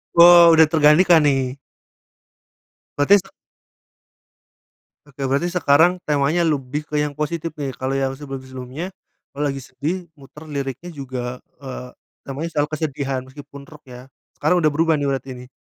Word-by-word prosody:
Oh, 170 -1 +8
udah 160 -1 +6
tergantikan 160 +2 +5
nih. 135 -2 0 1.4
Berarti 195 +8 +5
se 195 - -18 1.8
Oke, 140 -1 -13
berarti 145 +6 0
sekarang 175 +2 +3
temanya 150 +3 +1
lebih 150 -3 -1
ke 150 - -6
yang 150 - -3
positif 160 +2 -4
nih. 140 - -2
Kalau 130 +1 -3
yang 135 -1 -1
sebelum-sebelumnya, 130 +3 -7 0.4
kalau 145 +1 -5
lagi 135 -1 -3
sedih 170 +7 -5
muter 150 +3 -14
liriknya 140 +3 -5
juga, 130 -5 -6 0.2
eee, 130 -2 -8 0.4
namanya 140 +4 -5
selalu 145 0 +1
kesedihan 140 -3 -3
meskipun 140 +1 -12
rock 150 -1 -15
ya. 125 0 -12 0.3
Sekarang 180 - +2
udah 155 - +3
berubah 165 +1 +2
nih 145 -1 -2
berarti 135 0 -3 0.2
nih? - - -18
145 Hz, 140 wpm, -21 LUFS, 135-160 Hz, 1.8 s, Oh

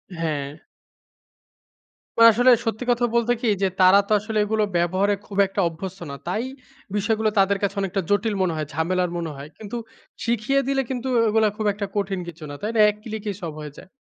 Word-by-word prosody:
হ্যাঁ। 150 -3 -3 1.6
তো - - +8
আসলে 245 +3 +5
সত্যি 225 +2 -2
কথা 240 0 +2
বলতে 235 +1 +3
কি 240 - 0
যে 195 - +3
তারা 185 +2 +7
তো - - -8
আসলে 220 +1 -4
এগুলো 215 0 +1
ব্যবহারে 185 +4 +1
খুব 200 - -8
একটা 195 +1 -2
অভ্যস্ত 185 +3 -7
না। - - -5
তাই 215 +6 -1 0.5
বিষয়গুলো 215 +1 +1
তাদের 195 +1 +3
কাছে 200 +1 0
অনেকটা 195 0 -1
জটিল 205 +2 +1
মনে 175 -3 +1
হয়, 155 -2 -3
ঝামেলার 180 +3 0
মনে 165 -2 -3
হয়। 140 +2 -9
কিন্তু 220 +2 -6 0.5
শিখিয়ে 235 +4 +1
দিলে 270 -1 +1
কিন্তু 260 0 -3 0.2
এগুলা 220 0 +3
খুব 215 - -2
একটা 200 0 -4
কঠিন 195 -2 -1
কিছু 160 -2 -9
না। 145 - -6
তাই 215 +2 -2
না? - - +2
এক 210 - -3
click 220 -2 -6
এই - - -7
সব 165 -2 -4
হয়ে 150 -1 -8
যায়। - - -13
200 Hz, 195 wpm, -23 LUFS, 180-220 Hz, 1.6 s, তো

